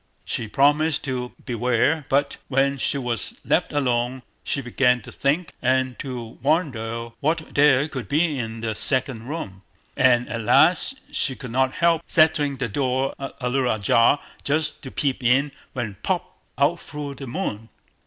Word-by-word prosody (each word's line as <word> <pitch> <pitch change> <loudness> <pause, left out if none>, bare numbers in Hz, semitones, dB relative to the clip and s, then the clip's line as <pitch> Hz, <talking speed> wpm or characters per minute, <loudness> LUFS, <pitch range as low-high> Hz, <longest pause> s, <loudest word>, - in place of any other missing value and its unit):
She 110 - -3
promised 145 +6 +3
to 125 -2 -3
beware; 125 +5 +1
but 140 +1 +1
when 135 +1 +1
she 140 - 0
was 120 -3 -3
left - - +1
alone, 125 -2 0 0.2
she - - -1
began 125 -1 +2
to - - -10
think 145 +3 0
and 130 0 +1
to 120 -4 -6
wonder 115 -7 -1
what 155 +2 -1
there 145 -1 +5
could 130 -6 -6
be 150 -1 +1
in 115 -1 -5
the 110 -1 -1
second 130 -1 -1
room, 115 - -6 0.3
and 125 -2 +4
at 115 - -4
last 175 - +4 0.2
she 135 - -1
could 125 -4 -8
not 130 +1 +1
help 170 -1 +2
setting 155 -3 +3
the 130 - -1
door 130 +3 0
a 135 -2 -5
little 125 0 +1
ajar, 115 +6 +3 0.2
just 150 +2 0
to 135 - -7
peep 135 -1 -1
in, 135 +4 +3 0.2
when—POP! 120 - -2 0.3
out 145 +5 +2
flew 145 -1 -6
the 135 0 -8
Moon. 115 - -4
135 Hz, 155 wpm, -23 LUFS, 120-145 Hz, 0.3 s, there